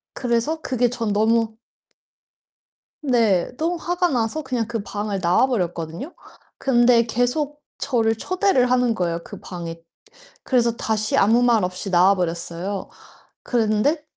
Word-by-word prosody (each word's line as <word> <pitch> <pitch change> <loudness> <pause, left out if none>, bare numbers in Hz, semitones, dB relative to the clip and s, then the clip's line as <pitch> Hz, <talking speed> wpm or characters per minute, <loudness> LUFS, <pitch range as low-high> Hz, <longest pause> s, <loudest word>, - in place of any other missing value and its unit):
그래서 245 +6 0
그게 250 -3 +1
전 230 -4 -2
너무 220 +1 +2 1.5
네. 230 - +2
너무 335 +2 -1
화가 355 +1 0
나서 245 +3 -1
그냥 250 -5 -2
그 230 -3 -3
방을 205 -1 -3
나와 175 +8 +3
버렸거든요. 175 - -3 0.4
근데 240 -2 +4
계속 275 +6 -1 0.2
저를 225 -5 +1
초대를 365 - +1
하는 245 -2 +2
거예요, 170 -3 -1
그 - - -10
방에. 170 -2 -7 0.6
그래서 235 -3 +2
다시 215 -1 0
아무 225 +5 +4
말 230 -5 +3
없이 180 +2 -3
나와 185 +3 +5
버렸어요. 175 +2 -3 0.5
그랬는데 235 +6 +1
230 Hz, 270 characters per minute, -22 LUFS, 200-255 Hz, 1.5 s, 나와